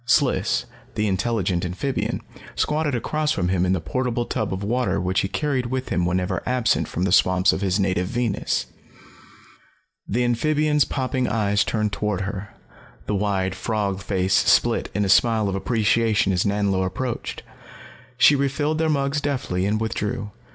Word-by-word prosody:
Sliss, 125 - +2 0.3
the 105 0 0
intelligent 95 -2 0
amphibian, 95 +10 -2 0.3
squatted 150 -2 0
across 150 +5 -1
from 90 -2 -1
him 90 -1 +1
in 90 - +2
the 95 - 0
portable 120 +6 -2
tub 110 - -2
of 95 +1 -3
water 120 0 0
which 90 +1 0
he - - 0
carried 135 +1 -1
with 130 +1 -3
him 90 0 0
whenever 90 +1 -1
absent 125 -2 +1
from 90 - -3
the 95 - +1
swamps 90 0 +4
of - - -3
his 95 0 +1
native 95 -2 0
Venus. 105 - -1 1.4
The 120 +5 0
amphibian's 150 +5 +2
popping 130 -1 -1
eyes 105 -3 +1
turned 105 -2 -1
toward 105 -3 -1
her, 100 +1 -5 0.6
the - - -2
wide 95 -2 0
frog 100 0 -2
face 95 -1 0
split 95 - +3
in 105 0 +1
a - - 0
smile 110 +2 +4
of 100 - -1
appreciation 110 0 +1
as 90 +2 +1
Nanlo 100 -2 +1
approached. 115 +7 -4 0.7
She 145 +3 +6
refilled 145 +3 0
their 160 -1 +1
mugs 140 0 0
deftly 110 -10 -1
and 105 +1 0
withdrew. 110 0 -3
105 Hz, 160 wpm, -23 LUFS, 95-125 Hz, 1.4 s, She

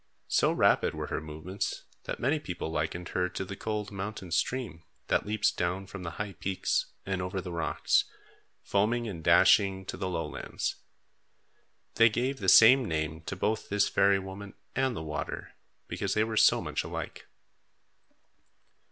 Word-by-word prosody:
So - - +3
rapid - - +3
were - - -4
her - - -1
movements 80 +5 -5 0.2
that - - -4
many 145 +5 +1
people 90 - -5
likened 80 +3 -3
her 90 0 0
to 95 - -4
the 100 - -6
cold 105 -1 -3
mountain 95 -2 -6
stream, 105 -4 -1 0.3
that - - +1
leaps 105 0 +2
down 90 +2 -2
from 95 0 -9
the 85 - -4
high 105 -1 -4
peaks 95 0 -1 0.2
and 95 -1 -2
over 90 +1 -3
the 90 -1 -6
rocks, 85 -2 +1 0.6
foaming 115 +4 +1
and 85 -6 -6
dashing 95 +2 +5
to - - -5
the 95 - -2
lowlands. 80 -4 -3 1.2
They 115 0 +7
gave 130 +5 -1
the 95 -2 +2
same 125 +6 +8
name 80 -1 -2
to - - -3
both 105 +4 -1
this 105 0 +2
fairy 100 0 +4
woman 95 +1 -8 0.2
and 130 -1 +1
the 80 - -5
water, 75 -2 -5 0.3
because - - -2
they 110 - +3
were 110 0 -3
so - - +5
much - - -2
alike. - - -6
95 Hz, 160 wpm, -29 LUFS, 90-105 Hz, 1.2 s, same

